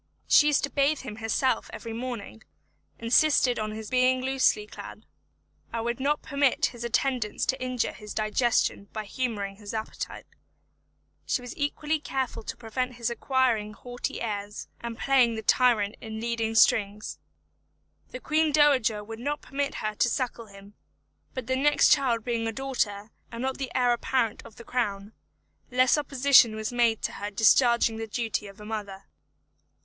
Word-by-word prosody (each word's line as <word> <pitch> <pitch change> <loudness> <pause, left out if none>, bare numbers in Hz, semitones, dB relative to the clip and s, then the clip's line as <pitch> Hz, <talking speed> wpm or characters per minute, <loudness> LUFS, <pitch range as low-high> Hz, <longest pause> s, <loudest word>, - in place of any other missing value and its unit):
She 295 - +6
used 295 -1 +2
to 280 - -2
bathe 285 +1 +2
him 220 -5 -8
herself 225 +4 0
every 230 -1 -7
morning; 230 -2 -6 0.6
insisted 245 +1 +3
on 215 0 -2
his 215 0 -7
being 255 0 +3
loosely 260 -5 +2
clad; - - -10 0.7
and 230 0 -3
would 235 +1 -2
not 290 +3 0
permit 285 +2 +2
his 240 -1 -8
attendants 235 -2 0
to 265 - -1
injure 255 -1 -1
his 210 -1 -9
digestion 215 -1 +1
by 215 -1 -4
humouring 205 -3 -3
his 205 +1 -7
appetite. 220 0 -5 1.0
She 250 - 0
was 245 - -8
equally 300 +2 -1
careful 265 -5 -3
to - - -7
prevent 250 +2 -3
his 235 0 -2
acquiring 235 -4 0
haughty 245 +3 -6
airs, 205 -2 -4
and 235 -1 -6
playing 255 -4 +3
the 220 - -5
tyrant 220 -4 +3
in 220 0 -6
leading 225 -1 -2
strings. 210 -1 +2 0.9
The 255 - -7
Queen 310 +3 +1
Dowager 265 -8 +3
would 225 +1 -8
not 290 +4 -3
permit 280 0 -3
her 215 - -1
to 240 - +2
suckle 240 -2 -3
him; 200 0 -14 0.6
but 260 -2 -4
the 260 +2 0
next 290 +3 +4
child 245 -6 +3
being 230 -1 -1
a - - -1
daughter, 220 -5 -2 0.2
and 235 +1 -5
not 265 0 -2
the 265 -3 -4
Heir 245 -1 +3
Apparent 235 -2 -1
of 225 - -17
the 235 - -11
Crown, 205 -4 -2 0.6
less 255 0 +4
opposition 275 -5 +4
was 220 +2 -4
made 235 -2 +2
to - - -1
her 205 +1 -5
discharging 225 +2 +4
the 225 0 -5
duty 220 -2 -2
of 195 +1 -13
a 210 - -10
mother. 200 -3 -6
235 Hz, 165 wpm, -27 LUFS, 215-260 Hz, 1.0 s, She